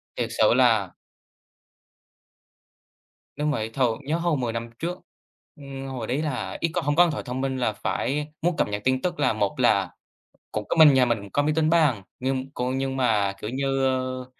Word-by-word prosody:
Thiệt - - -2
sự - - +5
là - - +3 2.5
Đúng 150 0 0
vậy. 110 -6 -2
Thường 115 -1 0
nhớ 155 +4 0
hồi 170 -3 0
10 120 -3 -2
năm 115 0 -4
trước, 175 +2 -3 0.6
ừm, 135 -2 -8
hồi 125 -4 -5
đấy 135 +5 -1
là 145 -5 -3
ít 170 - +1
có 175 - 0
hông 145 -1 0
có 175 - +7
điện 170 - 0
thoại 145 - -4
thông 125 +1 -4
minh 135 -1 -1
là 115 -4 0
phải 145 +7 -2
muốn 170 -1 0
cập - - +2
nhật 105 0 -3
tin 130 0 +2
tức 175 -3 -2
là, 145 - +2
một 100 -2 -1
là - - +3 0.6
cũng 105 -1 -3
có - - 0
mình 155 -4 +8
nhà 130 -1 +5
mình 120 -2 +1
cũng 100 -2 -11
có 145 - +2
máy 150 +1 +1
tính 160 -1 +2
bàn. 150 - +3 0.2
Nhưng 130 +1 -2
có 125 -1 -2
nhưng 135 0 -2
mà, 105 -6 +2
kiểu 105 - -4
như, 135 +1 0
ơ, 130 -1 -1
135 Hz, 210 wpm, -25 LUFS, 125-150 Hz, 2.5 s, mình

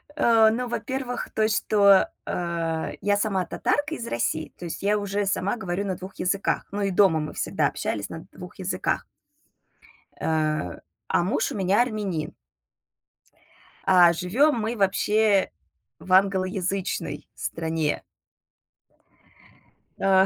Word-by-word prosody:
А, 230 -6 +5
ну, 245 +2 -2
во-первых, 250 0 -3
той, 215 0 +2
что, 200 -2 +4 0.2
а, 165 -2 -2
я 205 0 +2
сама 200 -3 0
татарка 295 - -1
из 235 - -6
России. 155 +6 -2
То 175 - -8
есть 170 - -6
я 205 +1 +3
уже 205 0 -1
сама 195 +2 0
говорю 190 -1 -3
на 190 - -2
2 185 +2 -10
языках, 195 +2 -1
но 205 0 -2
и 195 - 0
дома 185 -4 +4
мы 150 - -4
всегда - - 0
общались - - -3
на - - -8
2 - - -11
языках. - - -1 1.1
Э, 155 - -1 0.3
а - - +2
муж 185 - 0
у - - -5
меня 195 +3 +3
армянин. 210 -9 -2 1.5
А 175 -2 +6
живём 235 - +2
мы 225 +2 -2
вообще 205 +1 +2 0.5
в 185 - -3
англоязычной 185 -4 0
стране. 160 -2 -2 2.0
Э. 190 -1 +4
195 Hz, 125 wpm, -25 LUFS, 175-215 Hz, 2.0 s, А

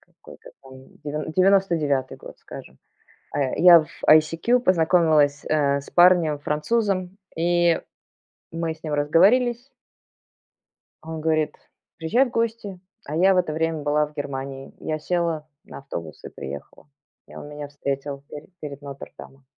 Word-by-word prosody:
Какой-то - - -16
там 135 -1 -15 0.3
дев 150 +1 -4
девяносто 195 -2 +4
девятый 140 -4 -1
год, - - -12
скажем. 65 +1 -12 0.6
Э, 135 -3 0
я 175 0 +8
в 155 - -9 0.2
ICQ 165 +10 +4
познакомилась, 160 -7 +3
э, 140 -2 +1
с - - -14
парнем, 175 -4 +4
французом. 185 +5 -1 0.2
И 175 0 +2 0.7
мы 165 -1 -3
с 160 +1 -21
ним 155 -2 -4
разговорились. 235 - +3 1.3
А 160 - -12
он 160 -1 -5
говорит: 155 -1 0 0.4
"Приезжай 220 +12 +2
в - - -6
гости". 225 -5 -3 0.3
А 150 - -5
я 190 +4 +4
в 185 - +1
это 175 -4 +1
время 160 -1 -1
была 150 +1 +2
в 150 - -15
Германии. 135 -2 -6
Я 155 0 -3
села 165 -2 -2 0.2
на - - -10
автобус 85 - -8
и - - -7
приехала. 70 - -10 0.4
И - - -14
он 145 - -9
меня 150 0 -7
встретил 140 0 -5
пере 150 0 -10
перед 145 -2 -8
Нотр-Дамом. 135 -1 -11
155 Hz, 145 wpm, -23 LUFS, 145-175 Hz, 1.3 s, я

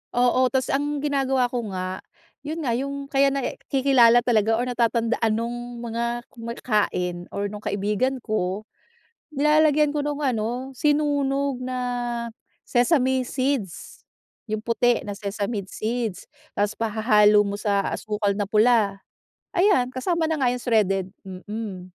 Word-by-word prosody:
Oo, 250 +1 +3
tapos 260 0 -1
ang 290 +1 -1
ginagawa 270 -3 +1
ko 240 -3 -2
nga, 185 0 -3 0.4
yun 310 +3 -5
nga 245 - 0
yung, 275 +3 -3
kaya 275 0 +4
nai 275 -2 -2
kilala 250 -3 +5
talaga 225 -2 +2
or 235 - 0
natatandaan 235 -2 +1
nung 240 +1 -5
mga 235 +1 -2
kumakain 210 -7 -2
or 200 0 -4
nung 210 - -7
kaibigan 210 +6 -1
ko, 205 -2 -2 0.7
nilalagyan 300 0 +3
ko 290 - 0
nung 295 0 -2
ano 250 +1 -2
sinunog 280 -2 +1
na 255 0 -3 0.9
sesame 260 0 +2
seeds, 255 -7 -3 0.4
yung 215 -1 -3
puti 235 +1 +1
na 200 - -4
sesame 200 0 -3
seeds, 220 +1 -4 0.2
tapos 205 +1 -1
pahahalo 215 -2 +4
mo 200 0 -1
sa 205 -1 +1 0.2
asukal 210 -2 -1
na 205 - 0
pula, 210 -1 +3 0.6
ayan 360 -10 +4
kasama 320 +6 -1
na 320 - 0
nga 250 -3 +2
yung 250 - -5
shredded, 195 -5 +1 0.2
mhm. 195 +1 -6
240 Hz, 135 wpm, -24 LUFS, 210-270 Hz, 0.9 s, kilala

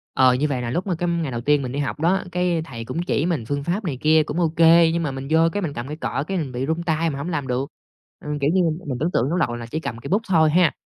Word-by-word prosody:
Ờ, 130 -1 +5
như 135 +4 +1
vậy 135 -4 -2
là 120 - -3
lúc 175 +10 -2
mà 180 - 0
cái, 175 +2 -2
ừm, 170 -1 0
ngày 150 -5 -3
đầu 120 - -3
tiên 145 +3 +2
mình 130 -2 -4
đi 140 - -3
học 145 +1 -3
đó, 175 +5 +2
cái, 180 -2 0
thầy 115 -6 -7
cũng 145 +8 -3
chỉ 160 -4 0
mình 160 -10 -1
phương 145 +1 -2
pháp 180 +8 -2
này 150 -8 -3
kia 155 0 +4
cũng 150 +3 -4
ô 170 - +2
kê, 165 0 +6
nhưng 170 0 0
mà 145 - -1
mình 135 0 -6
vô, 160 - +5
cái, 205 - -2
mình 155 -6 -3
cầm 120 +2 -5
cây 150 - -5
cọ, 140 -3 -2
cái, 195 -1 -2
mình 145 -6 -3
bị 130 +2 -3
run 160 +3 -1
tay 165 -1 0
mình 140 - -4
hổng 150 +5 -4
làm 145 -5 -2
được. 130 +3 -2 0.6
Ừm, 150 0 -3
kiểu 140 +1 +2
như, 190 - +3
m 160 -2 0
mình 130 - -2
tưởng 160 +5 0
tượng 125 +5 +1
lúc 175 - 0
đầu 120 -8 0
là 120 -1 -6
chỉ 155 +7 -4
cầm 115 -7 -5
cây 115 - -8
bút 200 +4 +2
thôi 160 -4 +4
ha, 175 -2 +4
155 Hz, 335 wpm, -22 LUFS, 135-170 Hz, 0.6 s, kê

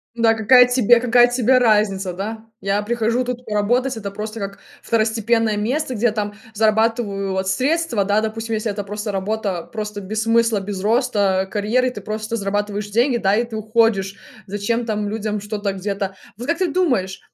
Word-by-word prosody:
Да 230 -1 +4
какая 235 +3 +6
тебе 245 -1 +4
какая 245 0 +5
тебе 250 +1 +3
разница, 210 -5 +2
да? 220 +4 -5 0.2
Я 195 +1 0
прихожу 235 +2 0
тут 250 0 -4
поработать, 235 +4 0
это 200 -2 -5
просто 215 +2 -6
как 195 -1 -6 0.2
второстепенное 225 0 +1
место, 260 +7 -1
где 235 0 -2
я 235 - +4
там 205 -1 -3 0.2
зарабатываю 215 -2 +1
вот 190 0 -1
средства. 260 - 0
Да, 205 +2 +2
допустим, 225 +1 -3
если 215 0 -2
это 205 0 -5
просто 210 +1 -4
работа 195 -2 -2
просто 210 -2 -6
без 215 +3 -3
смысла, 230 -2 +2
без 195 -1 -5
роста, 205 -4 +1
карьеры, 230 +5 +1
ты - - -7
просто 215 +1 -4
зарабатываешь 205 0 -2
деньги, 240 +4 +2
да, 195 -3 +2
и 230 - +2
ты 230 -2 -6
уходишь. 215 -3 +1 0.3
Зачем 205 +4 -1
там 210 -2 -2
людям 210 -1 -3
что-то 205 -1 -3
где-то? 195 0 -3 0.2
Вот 245 +3 -7
как 335 +2 0
ты 370 - +2
думаешь 250 - 0
215 Hz, 175 wpm, -20 LUFS, 205-235 Hz, 0.3 s, какая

